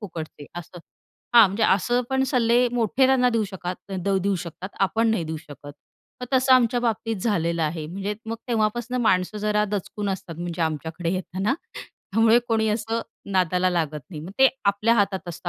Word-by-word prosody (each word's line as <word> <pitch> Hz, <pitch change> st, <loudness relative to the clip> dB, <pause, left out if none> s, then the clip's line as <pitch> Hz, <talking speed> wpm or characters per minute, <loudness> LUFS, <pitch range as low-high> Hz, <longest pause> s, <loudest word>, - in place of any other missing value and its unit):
फुकटचे 160 Hz, -7 st, -8 dB
असं. 175 Hz, +1 st, -10 dB, 0.6 s
हां, 230 Hz, -3 st, +9 dB
म्हणजे 200 Hz, +4 st, -3 dB
असं 240 Hz, +6 st, +2 dB
पण 265 Hz, 0 st, +2 dB
सल्ले 245 Hz, -2 st, +3 dB
मोठे 245 Hz, +2 st, +2 dB
त्यांना 255 Hz, -2 st, +4 dB
देऊ 230 Hz, -2 st, +1 dB
शकात 185 Hz, -1 st, -7 dB, 0.3 s
देऊ 200 Hz, 0 st, +1 dB
शकतात, 175 Hz, +2 st, -7 dB
आपण 225 Hz, +4 st, +2 dB
नाही 200 Hz, -7 st, 0 dB
देऊ 160 Hz, 0 st, -4 dB
शकत. 145 Hz, -2 st, -11 dB, 0.5 s
मग 250 Hz, -, -4 dB
तसं 260 Hz, 0 st, +4 dB
आमच्या 245 Hz, -1 st, +3 dB
बाबतीत 225 Hz, -1 st, -1 dB
झालेलं 170 Hz, -6 st, 0 dB
आहे, 155 Hz, 0 st, -2 dB
म्हणजे 195 Hz, +5 st, -4 dB
मग 225 Hz, +1 st, -3 dB
तेव्हापासून 235 Hz, +2 st, 0 dB
माणसं 185 Hz, 0 st, +1 dB
जरा 210 Hz, 0 st, +1 dB
दचकून 205 Hz, 0 st, -4 dB
असतात, 185 Hz, -3 st, -5 dB
म्हणजे 170 Hz, -1 st, -3 dB
आमच्याकडे 160 Hz, +2 st, -2 dB
येताना. 190 Hz, +6 st, -1 dB, 0.2 s
त्यामुळे 225 Hz, +3 st, +1 dB
कोणी 220 Hz, -1 st, +2 dB
असं 225 Hz, +1 st, -1 dB, 0.3 s
नादाला 185 Hz, 0 st, +2 dB
लागत 160 Hz, -4 st, -1 dB
नाही 155 Hz, -5 st, -7 dB
मग 175 Hz, -, -8 dB
ते 265 Hz, 0 st, +7 dB, 0.2 s
आपल्या 205 Hz, +3 st, +3 dB
हातात 195 Hz, -4 st, 0 dB
असतं, 175 Hz, +1 st, -6 dB
200 Hz, 170 wpm, -24 LUFS, 175-230 Hz, 0.6 s, हां